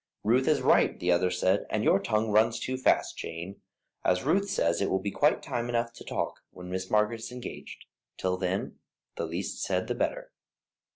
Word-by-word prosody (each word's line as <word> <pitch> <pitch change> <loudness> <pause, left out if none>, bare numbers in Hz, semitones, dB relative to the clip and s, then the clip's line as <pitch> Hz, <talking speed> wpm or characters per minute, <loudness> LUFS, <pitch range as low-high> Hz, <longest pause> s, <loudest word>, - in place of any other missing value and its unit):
"Ruth 125 +5 +3
is 150 -4 +3
right," - - +4
the 90 - +1
other 90 +1 +3
said, 95 +2 +1
"and 110 - 0
your - - +4
tongue 110 0 0
runs 110 +2 +3
too 130 - -2
fast, 130 - +2
Jane. 85 +4 -6 0.4
As 90 0 +2
Ruth 200 +1 +2
says, 85 - +1
it 100 - +1
will 95 - +2
be 100 +1 -3
quite 145 +8 +2
time 120 -3 -3
enough 115 0 -1
to - - -11
talk - - -3
when 90 0 -10
Miss 95 0 -3
Margaret 105 +2 +2
is 115 +2 -7
engaged; 125 -1 -8 0.3
till 90 0 0
then 95 +1 -3 0.4
the - - -3
least - - -4
said - - 0
the - - -2
better." - - -2
105 Hz, 195 wpm, -28 LUFS, 95-120 Hz, 0.4 s, right